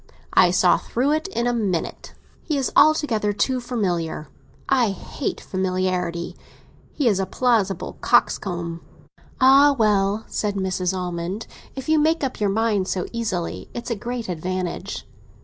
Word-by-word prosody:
I - - +6
saw - - +4
through 260 +5 0
it 315 +4 0
in 235 -11 -2
a 245 - +1
minute. 200 -8 -2 0.3
He 300 - -2
is 270 - -1
altogether 255 -9 +4
too 255 +5 0
familiar—I 200 - -2
hate 195 - -4
familiarity. 185 -2 -2 0.6
He 285 - 0
is 200 -4 +3
a 190 - -1
plausible 205 -5 0
coxcomb." 170 -3 +1 0.6
"Ah, 275 +2 +6
well," 210 -1 +2
said 205 -1 -2
Mrs. 190 -1 -1
Almond; 180 +3 -4 0.3
"if 265 -1 -6
you 315 0 +4
make 320 +1 +2
up 265 - -2
your 205 -1 +1
mind 210 -2 +1
so 185 -2 -1
easily, 210 -8 -3
it's 240 +1 -5
a - - +1
great 235 +2 -5
advantage." 180 +1 -4
205 Hz, 140 wpm, -23 LUFS, 185-245 Hz, 0.6 s, I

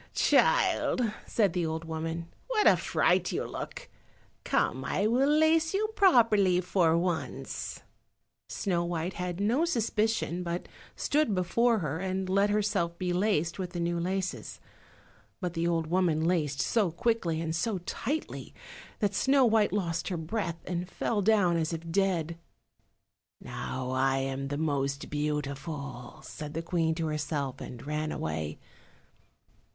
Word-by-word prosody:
"Child," 485 - +3 0.2
said 205 -6 +2
the 180 -1 0
old 160 0 -3
woman, 165 +1 -4 0.2
"what 445 -4 +1
a - - +8
fright - - +2
you - - -1
look; - - -6 0.6
come, - - 0
I 205 - 0
will 250 +6 +3
lace 315 +3 +3
you 425 +2 +1
properly 220 - +5
for 175 -2 +2
once." 175 -1 -3 0.7
Snow 175 -4 0
white 175 +1 -2
had 180 0 -4
no 230 +10 +2
suspicion, 220 - 0
but 175 0 -3 0.3
stood 290 -8 +1
before 230 +6 +2
her, 150 +2 -2
and 190 0 -2
let 200 +2 +3
herself 205 -5 0
be 180 -1 -1
laced 180 -3 +1
with 180 -1 -4
the 175 - -3
new 170 0 0
laces. 185 +2 -3 0.8
But 180 -3 -3
the 165 0 0
old 165 -1 +1
woman 165 -2 +1
laced 155 -5 +1
so 195 - +2
quickly 170 -2 0
and 160 0 -2
so 200 +5 0
tightly 240 - -4 0.5
that 205 -1 +1
Snow 270 +5 +4
white 220 -2 +3
lost 170 -4 -1
her 180 - -2
breath 170 +1 -3
and 180 0 -3
fell 210 +2 -1
down 195 -4 +3
as 160 0 -1
if 165 0 -5
dead. 170 -3 0 1.0
"Now 130 0 -5
I 135 +1 +2
am 135 0 -2
the 145 +1 -3
most 140 -2 -1
beautiful," 145 -2 -4
said 150 0 -7
the 165 - -2
Queen 165 -2 0
to 165 -1 -2
herself, 145 -3 -2
and 120 0 -8
ran 150 +1 -2
away. 80 -1 -3
175 Hz, 145 wpm, -29 LUFS, 160-205 Hz, 1.0 s, a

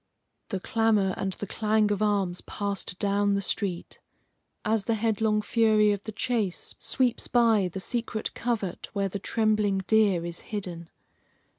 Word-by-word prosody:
The 195 - -2
clamor 215 -2 +2
and 190 -1 -2
the 205 - -5
clang 215 +1 +1
of 205 0 -1
arms 200 -4 +1
passed 200 -3 -4
down 200 0 +1
the - - +1
street 185 -3 -2 0.7
as 215 -2 +1
the 230 - +1
headlong 215 -1 +1
fury 215 -2 +3
of 205 -1 -3
the 220 - -4
chase 220 -4 -1
sweeps 250 -2 0
by 225 -5 +3
the 190 - -5
secret 230 +1 -3
covert 220 -7 -3
where 200 -1 0
the 200 - -4
trembling 215 -1 +1
deer 200 -5 +3
is 170 0 -4
hidden. 180 -6 -6
210 Hz, 150 wpm, -27 LUFS, 195-220 Hz, 0.7 s, fury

